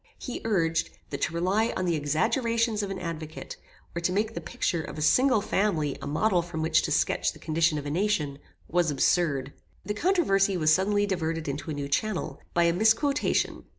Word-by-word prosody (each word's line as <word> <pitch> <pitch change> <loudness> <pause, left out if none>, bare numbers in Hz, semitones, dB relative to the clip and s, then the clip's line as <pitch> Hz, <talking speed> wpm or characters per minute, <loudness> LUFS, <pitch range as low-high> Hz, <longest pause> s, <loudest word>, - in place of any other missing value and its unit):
He 250 - -6
urged, 165 -7 +1 0.2
that 140 - -4
to - - 0
rely 195 +7 +1
on 185 - -1
the 170 -2 +1
exaggerations 220 - 0
of 200 - -3
an 195 - -4
advocate, 165 -3 -6 0.4
or 170 - -2
to 170 - 0
make 215 +4 0
the - - -5
picture 180 -8 -2
of 155 - -8
a - - -4
single 250 - +4
family 165 -10 0
a - - -5
model 175 +5 +2
from 165 -2 -5
which 160 - +3
to - - -3
sketch - - +1
the - - -14
condition 160 0 +1
of 145 - -5
a 145 - -3
nation, 155 -6 0 0.3
was 175 -1 +1
absurd. 140 -1 +1 0.3
The 210 - -2
controversy 205 - +2
was 155 -2 +4
suddenly 205 +3 +2
diverted 165 -5 -2
into 145 +3 -4
a 155 - -3
new 140 -1 -4
channel, 205 +7 -2
by 170 - +4
a 170 0 +3
misquotation. 225 - +1
175 Hz, 195 wpm, -27 LUFS, 155-210 Hz, 0.4 s, single